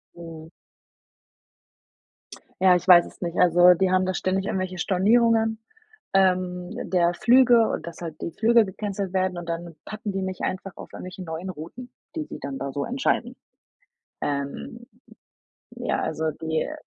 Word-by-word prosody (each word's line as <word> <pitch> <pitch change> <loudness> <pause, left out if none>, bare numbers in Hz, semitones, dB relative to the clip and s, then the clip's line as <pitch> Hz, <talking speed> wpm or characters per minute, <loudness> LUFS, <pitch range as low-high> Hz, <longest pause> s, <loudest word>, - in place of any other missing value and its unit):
Mhm. 165 -2 -10 2.1
Ja, 185 -1 +6
ich 180 - -2
weiß 175 -1 +8
es - - -17
nicht. 170 -1 -4
Also, 175 0 +7
die 190 +1 +1
haben 185 0 +2
da 185 - -1
ständig 190 +2 -1
irgendwelche 185 -1 -3
Stornierungen, 220 +5 +2 0.6
ähm, 180 -2 +1 0.2
der 175 -1 +2
Flüge 240 -1 +5
und, - - -4
dass 170 +1 -9
halt 160 -2 -7
die - - -3
Flüge 230 +4 +4
gecancelt 195 -1 -4
werden 185 -1 0
und 170 -1 -8
dann 170 0 -5
packen 215 -1 -5
die 195 0 -3
mich 190 -1 -4
einfach 185 0 -3
auf - - -11
irgendwelche 185 +1 -8
neuen 165 +3 -6
Routen, 185 +10 -9 0.3
die 315 - -2
sie - - -8
dann 135 0 -6
da 135 0 -4
so 140 +1 -3
entscheiden. 250 -1 -1 0.9
Ähm, 140 +12 -4 0.8
ja, - - -2
also 160 0 -1
die, 160 +1 -2
äh 305 - -6
185 Hz, 155 wpm, -24 LUFS, 170-205 Hz, 2.1 s, weiß